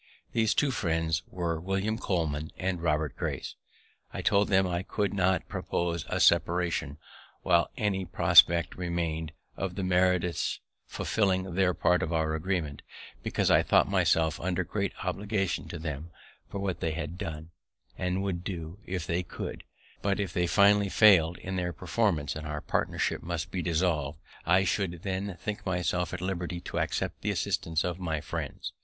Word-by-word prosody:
These 110 -2 +2
two 145 -2 +2
friends 80 -6 0
were 85 -3 -2
William 95 +5 -1
Coleman 80 -6 -1
and 90 -2 -2
Robert 75 -4 0
Grace. - - -3 0.6
I - - -5
told 100 0 +3
them 95 -1 +4
I 90 -1 -1
could 100 +1 -1
not 95 -2 +1
propose 85 -1 -2
a - - -1
separation 85 -4 +2 0.5
while 85 -2 +3
any 100 -4 0
prospect 85 -1 +5
remain'd 85 -3 -2 0.2
of 95 -2 -3
the 100 - -3
Meredith's 90 -1 +1 0.3
fulfilling 95 -4 0
their 90 -1 +2
part 90 +1 +3
of 80 - -2
our 80 -1 +1
agreement, 80 -3 -2 0.4
because - - +1
I - - +6
thought - - +4
myself 80 -1 +2
under 95 +1 -1
great 100 +3 -2
obligations 95 -4 -1
to 85 - -5
them 80 0 -5 0.4
for - - -5
what 95 -3 -2
they 80 - -1
had 85 +1 -4
done, 80 -4 -6 0.4
and 90 +1 -1
would 90 -3 -2
do 85 0 -6
if 90 -2 -3
they 85 +1 0
could; 90 - -6 0.4
but, 100 0 0
if 95 -4 -2
they 90 -1 +1
finally 100 +2 +5
fail'd 90 -6 +6
in 95 0 -5
their 90 -1 -1
performance, 85 -11 0
and 80 0 -5
our 75 0 -4
partnership - - -1
must 85 -2 -4
be 90 - -2
dissolv'd, 80 -4 0 0.3
I 90 +3 +5
should 90 -4 -1
then 95 -1 -3
think 105 +4 -4
myself 90 -1 -1
at - - -5
liberty 90 -2 -3
to - - -4
accept - - -2
the - - -1
assistance 80 0 0
of 90 0 -3
my 80 -4 -1
friends. - - -5
90 Hz, 165 wpm, -29 LUFS, 80-95 Hz, 0.6 s, I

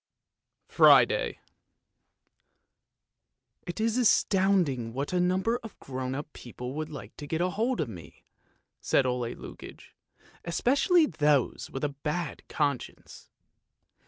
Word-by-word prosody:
FRIDAY - - +5 1.5
" - - -50
It 175 - -5
is 225 +2 +1
astounding 185 - +2
what 140 +6 -3
a 180 - +2
number 190 +7 +1
of 225 - -11
grown 130 -1 -5
up 145 +2 -7
people 125 +1 -8
would 155 +1 -4
like 135 -8 -9
to 145 - -8
get 160 +2 -2
hold 215 +8 0
of 150 - 0
me! 90 -9 -12 0.3
" - - -45
said 135 - +2
Ole 125 -2 -2
Lukoie, - - -11 0.2
" - - -29
especially 275 - +3
those 150 - +1
with 135 - -5
a 150 - +1
bad 150 +3 -4
conscience. 145 -4 -3
155 Hz, 130 wpm, -28 LUFS, 135-195 Hz, 1.5 s, FRIDAY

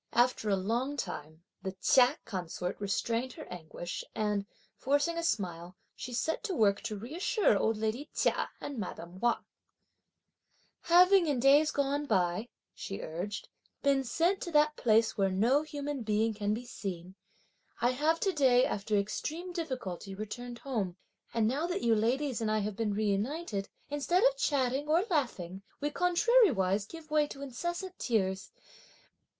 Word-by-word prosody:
After 240 -3 +2
a 200 - +4
long 235 +9 -1
time, 155 - -6 0.2
the 190 - -4
Chia 250 +6 +4
consort 180 -2 -4
restrained 230 +5 -1
her 310 - -9
anguish, 175 0 -6
and 210 -2 0 0.3
forcing 290 +5 +1
a 335 - -1
smile, 180 - -2 0.2
she 250 - -7
set 245 - -1
to 385 -5 -2
work 200 -6 +3
to 215 - -4
reassure 325 - +1
old 220 +2 +1
lady 220 +6 -2
Chia - - +1
and 280 -4 -5
madame 180 -2 -6
Wang. 240 +1 +1 1.4
"Having 360 +1 +6
in 285 -4 +1
days 285 +4 +6
gone 285 +1 0
by," 190 +2 +1 0.2
she 195 - -6
urged, 180 +6 -5 0.4
"been 275 -1 +3
sent 340 +10 +1
to - - -4
that 300 0 +4
place 225 -2 +2
where 195 -1 +3
no 230 +10 +3
human 290 -3 -4
being 220 0 +1
can 205 -1 -1
be 230 +4 -2
seen, 185 -6 -6 0.7
I 240 +1 +3
have 310 +5 +1
to 390 - +2
day 255 -4 +5
after 205 +1 -1
extreme 315 - -3
difficulty 250 - -4
returned 240 +4 -6
home; 215 -10 -3 0.3
and 225 -2 +2
now 285 +8 0
that 360 +3 -2
you 230 - +4
ladies 245 +4 +1
and 220 - 0
I 215 - +2
have 205 0 -3
been 210 -1 -1
reunited, 210 - -1 0.2
instead 290 +7 +1
of - - +5
chatting 275 - 0
or 335 +6 +3
laughing 195 - -1 0.2
we 295 +1 -1
contrariwise 345 - +3
give 320 +1 -11
way 300 -1 +3
to 280 -1 -8
incessant 345 +8 -4
tears! 190 -5 0
240 Hz, 155 wpm, -31 LUFS, 200-295 Hz, 1.4 s, Having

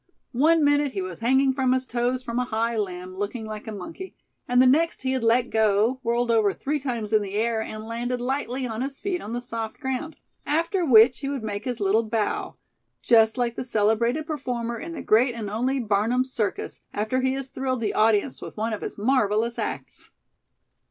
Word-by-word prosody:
One 315 +6 +4
minute 290 -1 +3
he 195 - -2
was 185 -2 -7
hanging 265 +3 +3
from 260 -1 +2
his 260 0 0
toes 245 +1 -1
from 240 -1 -2
a 250 - 0
high 230 0 -1
limb, 185 -3 -4
looking 205 +4 -4
like 215 0 -7
a - - -4
monkey; 330 - -8 0.3
and 245 0 +3
the 255 - +7
next 310 +4 +3
he 260 - 0
had 260 -2 -1
let 235 +2 +2
go, 220 +3 +2
whirled 235 0 0
over 215 -4 +3
three 295 +2 -2
times 235 -6 -3
in 215 - +5
the 200 -1 -5
air, 225 +1 +1
and 215 0 -6
landed 240 +2 -3
lightly 260 0 -2
on 225 -1 -4
his 275 +1 -4
feet 375 -3 -3
on 215 - -6
the 240 - -2
soft 230 -2 -5
ground; 265 +4 -3 0.3
after 335 +5 0
which 245 -3 +6
he 275 - -3
would 275 -5 -3
make 205 -1 -4
his 245 -2 -3
little 205 +2 +3
bow, 220 -1 -2 0.5
just 225 0 +4
like 240 -1 0
the - - -3
celebrated 235 +5 +1
performer 245 -6 -3
in 335 - -6
the - - -6
great 240 +3 +3
and 215 -3 -5
only 255 +5 0
Barnum's 235 +4 +1
Circus, 210 -4 -3
after 220 +5 0
he 260 0 +1
has 270 -1 -4
thrilled 260 -2 -2
the 215 - -1
audience 220 +3 +2
with - - -9
one 220 +1 -1
of 210 - -4
his - - -6
marvelous 225 0 +1
acts. - - -5
240 Hz, 205 wpm, -25 LUFS, 220-260 Hz, 0.5 s, the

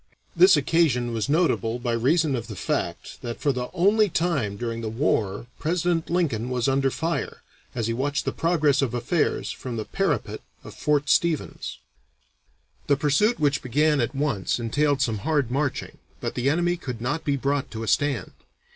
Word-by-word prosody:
This 180 0 +7
occasion 135 -5 +2
was 115 +4 -2
notable 145 -8 +1
by 120 -1 -2
reason 140 +6 +2
of 115 -2 -4
the 110 - -7
fact - - -3
that 120 -1 -5
for 145 - +2
the 125 -1 -3
only 205 +4 +3
time 145 - 0
during 115 0 -3
the 110 - -3
war 110 -4 0
President 170 0 0
Lincoln 140 -10 0
was 125 -1 0
under 135 0 +2
fire, 165 +5 -3 0.3
as 115 -3 -1
he 115 - 0
watched 140 +4 -1
the - - 0
progress 155 -5 +2
of 125 -3 -1
affairs 135 +7 0
from 125 -3 -6
the 110 - -3
parapet - - -1 0.2
of - - -10
Fort 145 -1 0
Stevens. 165 +1 0 1.1
The 140 - +3
pursuit 155 - +2
which 145 -2 +2
began 145 +3 +2
at 120 +4 -2
once 135 -9 0
entailed 140 +4 +1
some 110 -5 -1
hard 145 0 0
marching, 140 0 -2 0.2
but - - -3
the 125 +2 0
enemy 175 +3 +1
could 125 -8 -6
not 125 +8 -2
be 145 - +1
brought 140 +1 -1
to 110 -1 -6
a - - -5
stand. 135 -9 0
140 Hz, 175 wpm, -25 LUFS, 120-155 Hz, 1.1 s, This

